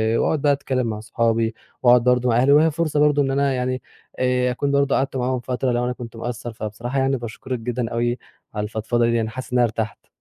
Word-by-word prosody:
وأقعد 150 +5 +1
بقى 145 - +4
أتكلم 130 -3 -1
مع 110 -2 -3
صحابي 115 0 0 0.3
وأقعد 120 -1 +6
برضو 125 0 +3
مع 115 - +3
أهلي، 130 +3 +4
وأهي 155 +3 +5
فرصة 155 -1 -1
برضو 150 -1 +4
إن 135 -1 0
أنا 140 0 +1
يعني 130 0 -2 0.4
آآ، 125 0 +2
أكون 140 +3 -1
برضو 140 0 +2
قعدت 135 0 -1
معاهم 130 0 0
فترة 125 +1 -1
لو 120 0 0
أنا 125 - -1
كنت 120 -1 -9
مقصر. 120 0 -5
فبصراحة 115 +4 -4
يعني 135 0 +1
باشكرك 120 +2 -5
جدًا 120 0 -3
أوي 120 +1 0 0.4
على 105 -1 -2
الفضفضة 110 +2 0
ديًّا، 115 -1 +1
حاسس 130 +3 -8
إن - - +3
أنا 120 - +5
ارتاحت. 110 -1 -4
125 Hz, 215 wpm, -22 LUFS, 115-135 Hz, 0.4 s, وأقعد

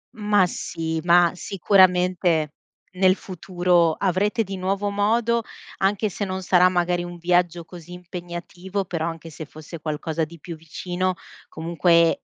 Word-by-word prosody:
Ma 205 -3 +3
sì, 160 -2 -4
ma, 175 0 +5
sicuramente, 180 -5 +2 0.4
nel 185 0 +4
futuro, 175 -3 +1
avrete 200 +6 0
di 195 -1 -6
nuovo 195 +2 -1
modo, 225 +3 +1 0.3
anche 205 +2 +1
se 205 - -4
non 190 0 -4
sarà 180 0 +5
magari 175 -1 0
un 175 0 -8
viaggio 175 0 +1
così 175 0 -12
impegnativo, 180 +2 -6
però 170 -3 -3
anche 165 0 -7
se 155 0 -8
fosse 155 +3 -10
qualcosa 155 +1 -2
di 170 +2 -13
più 165 +2 -8
vicino 180 +3 -3 0.3
comunque 170 +1 +2
180 Hz, 135 wpm, -23 LUFS, 170-190 Hz, 0.4 s, ma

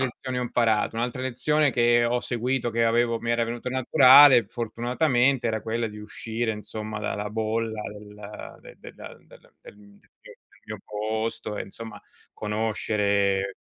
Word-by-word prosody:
lezioni 130 0 -3
ho - - -1
imparato? 115 -3 0
Un'altra 120 +2 -3
lezione 140 +4 +1
che 120 -1 +3
ho 120 +1 +1
seguito, 120 +1 -2
che 115 +1 +1
avevo 115 0 +1
mi 115 - -3
era 120 0 +1
venuta 120 +2 -5
naturale, 130 0 +7
fortunatamente, 125 +2 0
era 110 -1 -2
quella 115 +1 -2
di 105 -1 -9
uscire, 110 +2 -4
insomma, 105 0 -6
dalla 105 0 -4
bolla, 110 0 -2
del 105 0 -11
de - - -15
del - - -12
del - - -12 0.3
del - - -14 0.5
del - - -15 0.3
mio - - -7
posto 110 0 -4
e, - - -3
insomma, 105 +1 -10 0.3
conoscere 100 -2 -1
115 Hz, 145 wpm, -25 LUFS, 105-120 Hz, 0.5 s, naturale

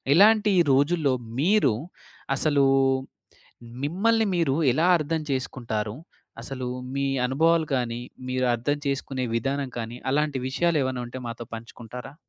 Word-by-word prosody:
ఇలాంటి 210 +3 +6 0.2
రోజుల్లో 145 0 +2 0.3
మీరు, 180 - +4 0.6
అసలు 145 -1 +2 1.2
మిమ్మల్ని 220 +9 +2
మీరు 160 -6 +1 0.2
ఎలా 160 +7 +2
అర్థం 155 0 -2
చేసుకుంటారు. 115 -5 -3 0.5
అసలు 130 +1 -5 0.3
మీ 140 - 0 0.2
అనుభవాలు 160 +4 +2
కానీ 120 -2 -2 0.3
మీరు 130 0 0
అర్థం 145 +5 -1
చేసుకునే 135 -1 -2
విధానం 135 +3 -1
కానీ 115 +1 -5
అలాంటి 150 0 +1
విషయాలు 170 +3 +1
ఏమన్నా 130 -1 -2
ఉంటే 120 +2 -7
మాతో 115 0 -6
పంచుకుంటారా? 120 +3 -9
135 Hz, 115 wpm, -25 LUFS, 125-160 Hz, 1.2 s, ఇలాంటి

